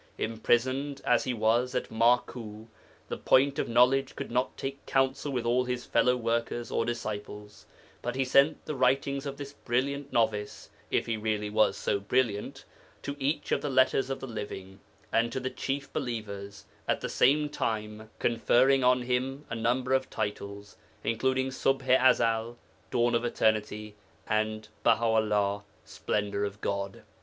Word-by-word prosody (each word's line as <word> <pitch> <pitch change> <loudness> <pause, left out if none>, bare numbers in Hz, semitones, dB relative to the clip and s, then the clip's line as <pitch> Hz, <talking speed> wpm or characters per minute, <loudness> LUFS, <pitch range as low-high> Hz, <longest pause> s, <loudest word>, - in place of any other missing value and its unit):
Imprisoned 130 +5 0
as 120 +4 +3
he 130 - 0
was 120 +4 +1
at 125 - -2
Maku, 115 -1 +1 0.4
the - - -4
Point 140 +2 +3
of - - -1
Knowledge 130 +3 +3
could - - -6
not 125 +2 0
take 135 +1 -5
counsel 135 +2 +1
with 125 -3 -2
all 125 +2 +2
his 125 0 -3
fellow 125 0 +3
workers 115 0 -2
or 115 - +1
disciples, 105 -3 -6 0.3
but 120 +1 -3
he 135 0 +1
sent 140 +4 +3
the - - -3
writings 135 +1 +1
of 140 0 -5
this 140 -1 -7
brilliant 140 +3 -2
novice 105 -3 -1 0.2
(if - - +1
he 115 -1 -1
really 105 -1 -2
was 110 0 +3
so 100 - 0
brilliant) 105 0 -1 0.4
to 140 - -4
each 145 +2 -1
of - - +2
the 145 - -2
'Letters 130 0 +3
of 135 - -3
the - - -6
Living,' 100 -5 -7 0.3
and 115 +1 +2
to 130 - -2
the 130 0 -3
chief 140 0 -4
believers, 100 -4 -5 0.2
at - - 0
the - - -2
same 150 +3 +3
time 110 -5 -3
conferring 125 +3 +3
on 125 0 +4
him 130 +3 -2
a - - -1
number 125 +3 0
of 130 0 +1
titles, 100 -1 -5 0.3
including 130 +3 0
Ṣubḥ 135 0 0
i 130 - +7
Ezel 115 +1 +1 0.3
('Dawn 120 +3 +2
of 115 0 +1
Eternity') 105 -2 0 0.3
and 110 0 -1
Baha 115 - +3
'ullah 105 -3 +1 0.2
('Splendour 100 -1 -2
of 100 0 -4
God 100 -1 -3
120 Hz, 160 wpm, -29 LUFS, 110-130 Hz, 0.4 s, i